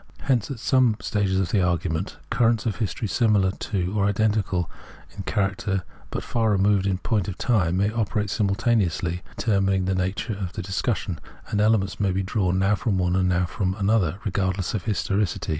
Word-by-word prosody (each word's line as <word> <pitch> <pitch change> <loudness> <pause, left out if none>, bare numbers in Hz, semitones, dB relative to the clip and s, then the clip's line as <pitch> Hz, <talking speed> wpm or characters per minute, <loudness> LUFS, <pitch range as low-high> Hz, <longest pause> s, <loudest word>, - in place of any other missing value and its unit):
Hence, 125 -6 +1
at 135 - -4
some 125 -2 +3
stages 100 -3 0
of 95 - 0
the 100 - +3
argument, 85 +1 -1
currents 115 0 +2
of 110 -4 -1
history 110 0 -2
similar 100 -1 +3 0.4
or 100 -2 +1
identical 100 -3 +1 0.5
in 100 - -5
general - - -24
char 100 -2 +2
acter, 95 -1 -2 0.3
but - - -4
far 115 -2 0
removed 100 -1 +3
in 95 -2 +1
point 100 0 -1
of 95 - -5
time, 90 -8 +1
may 100 +2 +2
operate 105 -2 -1
simultaneously 100 -5 +1
in 90 - -5 0.2
determining 95 -3 +1
the 95 - +1
nature 95 +4 -1
of 95 -3 -5
the 105 - -5
dis 95 +1 -2
cussion, 100 -7 -2 0.3
and 105 - +1
elements 105 -3 +2
may 100 -2 +2
be 95 +1 0
drawn, 95 -2 0
now 95 +2 +3
from 105 -1 0
one, 90 -1 +1
and 95 -1 +2
now 90 0 +2
from 95 +1 -2
another, 100 -4 +1
regardless 95 -2 -1
of 105 -5 -3
historicity. 100 -3 -1
100 Hz, 190 wpm, -24 LUFS, 95-110 Hz, 0.5 s, some